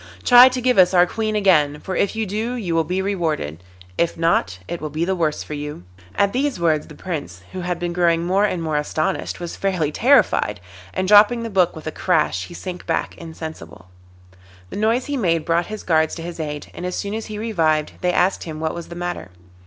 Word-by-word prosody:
Try 245 +1 +9
to 255 0 -3
give 250 -4 +3
us 185 0 +5
our 175 0 +7
Queen 215 +3 -2
again, 155 -8 +3
for 190 - -5
if 200 - 0
you 220 0 -1
do 220 +5 -3
you 195 -9 -3
will 165 0 +2
be 185 +3 -2
rewarded; 155 - -2 0.4
if 170 0 +1
not, 165 - +1
it 170 - -5
will 155 - -4
be 155 +3 -1
the 190 - 0
worse 160 -4 -1
for - - -8
you.' 150 -8 -6 0.3
At 200 0 +2
these 270 -3 -1
words 160 -3 +1
the 150 - -12
Prince, 145 - -6
who 185 - -5
had 180 -1 -2
been 175 0 -3
growing 170 -1 +2
more 190 +3 +2
and 180 -5 -2
more 155 -2 -1
astonished, 150 +1 -2
was 175 -1 -6
fairly 180 -6 -1
terrified, 225 - +3 0.3
and 185 0 -2
dropping 210 +4 +6
the 230 - -5
book 185 -3 +2
with 160 - -10
a 155 - -3
crash 180 +3 0
he 175 - -11
sank 180 -1 -7
back - - -1
insensible. 160 - -9 0.8
The - - -6
noise 225 +5 +1
he 290 -1 -2
made 165 -8 +1
brought 170 0 +1
his 215 0 -7
guards 160 -2 +2
to 165 - -7
his 170 0 -7
aid, 150 -2 -5
and - - -8
as 180 0 -3
soon 200 0 -3
as 220 0 -4
he 215 - -6
revived 165 -9 0
they 180 - +2
asked 185 +2 +1
him 155 -2 -6
what 160 0 -2
was 170 -1 -7
the 170 - -9
matter. 175 - -4
175 Hz, 225 wpm, -21 LUFS, 160-200 Hz, 0.8 s, Try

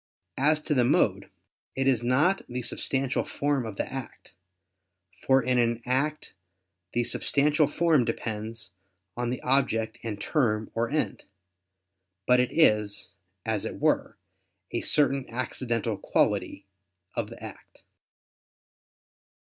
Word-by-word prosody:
As 150 +3 +4
to 155 - 0
the 125 -3 +3
mode, 120 - +2 0.5
it 135 - 0
is 130 -4 +3
not 145 +11 +3
the 125 0 -4
substantial 135 +2 -1
form 140 -4 -1
of 110 - -6
the - - -1
act, 135 -2 -8 0.9
for 135 -1 +5
in 125 0 +2
an 115 -1 +2
act 140 +5 -1 0.6
the 120 - +2
substantial 145 +5 +2
form 155 -2 +3
depends 110 -2 -4 0.4
on 120 0 -2
the 125 - -2
object 125 -4 +1
and 110 -3 -5
term 110 -6 0
or 115 0 0
end; 150 +1 -1 1.0
but 125 0 +5
it 125 - +1
is, 105 - +2 0.3
as 110 -2 -1
it - - -5
were, - - +1 0.5
a - - -1
certain 140 -3 +1
accidental 115 -3 -2
quality - - 0 0.5
of - - -3
the - - -11
act. - - -11
125 Hz, 125 wpm, -27 LUFS, 115-140 Hz, 1.0 s, for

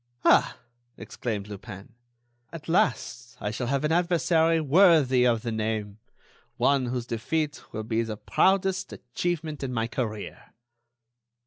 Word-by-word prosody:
"Ah!" - - +4 0.4
exclaimed 105 -4 -5
Lupin, 105 +1 -10 0.6
"at 165 -3 -9
last 125 - -1
I 105 - -3
shall 120 +2 -3
have 140 +2 0
an 150 - +1
adversary 165 -1 +2
worthy 150 -5 +4
of 115 -2 +1
the 115 - -2
name—one 110 +5 -3
whose 120 -1 -3
defeat 150 +7 -2
will 110 - -4
be 115 +1 0
the 110 -2 -4
proudest 190 - +1
achievement 160 -4 -4
in 135 -2 -3
my 115 -2 -1
career." 110 -3 -5
125 Hz, 125 wpm, -26 LUFS, 110-160 Hz, 0.6 s, Ah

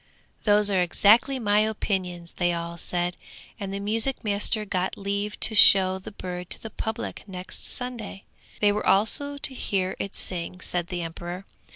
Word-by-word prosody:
'Those 205 -1 +4
are 190 -2 +2
exactly 220 +9 +4
my 210 -4 +2
opinions,' 185 -5 -2
they 175 -1 +1
all 170 0 -4
said, 175 +1 -2 0.4
and 200 -2 -5
the 200 - -4
music 225 +7 0
master 210 +1 0
got 185 -2 -2
leave 200 +1 -3
to 220 - +6
show 190 -2 +7
the 190 - -10
bird 180 -3 -7
to - - -1
the 225 - -8
public 220 +1 -5
next 185 -1 -7
Sunday. 240 -6 -4 0.4
They 205 -1 +5
were 205 - -2
also 285 +8 +2
to 275 - +1
hear 190 -6 -2
it 200 - -5
sing, 180 0 -5
said 175 -2 -2
the 175 -1 -4
emperor. 175 +3 -7
200 Hz, 170 wpm, -25 LUFS, 180-215 Hz, 0.4 s, show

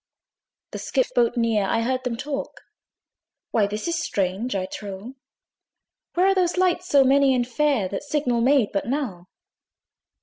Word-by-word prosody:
The - - -6
skiff 260 -3 -1
boat 240 0 +2
neared: 220 -4 +1
I 230 - +1
heard 255 +2 -1
them 240 -2 -3
talk, 280 +2 -5 0.9
"Why 210 -3 +2
this 210 +5 -4
is 335 -1 -1
strange, 200 - -2
I 185 -1 -1
trow! 200 +4 -8 1.0
Where 360 +2 +3
are 390 - +4
those 360 -2 +1
lights 365 -1 +1
so 280 -4 +5
many 270 0 +4
and 245 -1 0
fair, 270 -5 +1
That 195 - -4
signal 285 -5 -1
made 255 -3 +3
but 195 +1 -2
now?" 235 -10 -3
250 Hz, 160 wpm, -23 LUFS, 210-290 Hz, 1.0 s, so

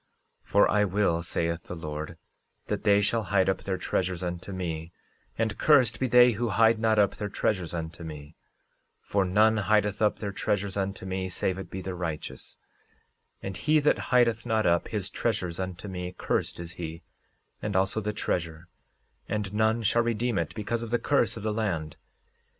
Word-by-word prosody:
13:19 - - -24
For 100 - +5
I 105 0 +4
will, 95 -4 +1
saith 85 0 -2
the 90 - -6
Lord, 75 -2 -6 0.5
that - - -2
they 100 -1 +5
shall 110 +1 +1
hide 95 -1 +2
up 95 - 0
their 95 -1 -2
treasures 90 -1 -1
unto 90 +2 -4
me; 85 -3 -4 0.5
and 110 -2 0
cursed 130 -7 +4
be 130 - +1
they 125 0 +7
who 115 +2 -1
hide 110 +2 +4
not 110 -1 +2
up 100 -2 +3
their 105 - -3
treasures 95 -4 -1
unto 80 0 -5
me; 75 -1 -8 0.7
for 100 -1 0
none 110 +4 +4
hideth 105 0 +1
up 105 - +3
their 100 -2 -4
treasures 100 0 -1
unto 95 -1 -3
me 95 0 -3
save 95 +1 -1
it 95 - -7
be 95 - -5
the 95 - -4
righteous; 85 -4 -5 0.9
and 95 -2 -4
he 155 - +3
that 150 - +1
hideth 115 -2 +3
not 110 -1 +1
up 85 0 +2
his 105 -4 -3
treasures 90 -7 -2
unto 95 +1 -5
me, 90 -1 -5
cursed - - -1
is 85 -1 -6
he, 85 -1 -7 0.6
and 105 -1 -3
also 95 +3 +1
the 105 +1 -1
treasure, 85 -5 -3 0.6
and 105 -2 -2
none 110 +2 +2
shall 115 +2 +3
redeem 115 -2 0
it 85 - -3
because 115 +2 -2
of 115 - -5
the 120 - +2
curse 140 -1 +1
of 110 - -7
the 110 -1 0
land. 85 -9 -2
100 Hz, 185 wpm, -28 LUFS, 90-110 Hz, 0.9 s, they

